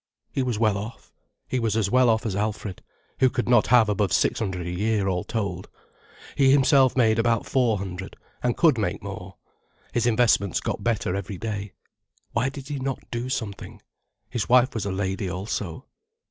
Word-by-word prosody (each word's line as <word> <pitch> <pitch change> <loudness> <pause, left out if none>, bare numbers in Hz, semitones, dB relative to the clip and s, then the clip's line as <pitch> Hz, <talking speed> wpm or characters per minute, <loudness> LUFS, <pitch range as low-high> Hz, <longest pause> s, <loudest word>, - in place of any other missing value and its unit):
He 135 - -1
was 125 -4 -1
well 105 -3 +2
off. 110 +3 -9 0.3
He 130 - -1
was 110 -2 0
as 100 -3 0
well 130 -1 +5
off 110 +1 +1
as 105 -4 -1
Alfred, 105 -2 -3 0.4
who 130 - +5
could 125 - -2
not 120 -3 +4
have 120 -2 +5
above 105 -3 0
six - - +2
hundred 95 -5 -3
a 85 - -3
year, 105 +2 0
all 90 -2 0
told. 100 -5 -4 0.7
He 135 -2 +4
himself 135 -1 +4
made 115 -2 +4
about 115 -1 +1
four 120 -5 +2
hundred, 95 -1 -6 0.3
and 125 -1 0
could 155 -9 +4
make 95 -4 -2
more. 95 -1 -7 0.6
His 120 0 +1
investments 110 -5 +3
got - - -4
better 105 -5 0
every 100 0 -4
day. 105 -1 -5 0.6
Why 125 - +1
did 135 0 -9
he 145 -2 -3
not 135 0 -4
do 120 +2 -3
something? 110 -6 -5 0.5
His 120 -3 -3
wife 125 +1 +5
was 110 -3 -3
a - - -1
lady 95 +1 -2
also. 95 - -4
110 Hz, 185 wpm, -25 LUFS, 100-125 Hz, 0.7 s, well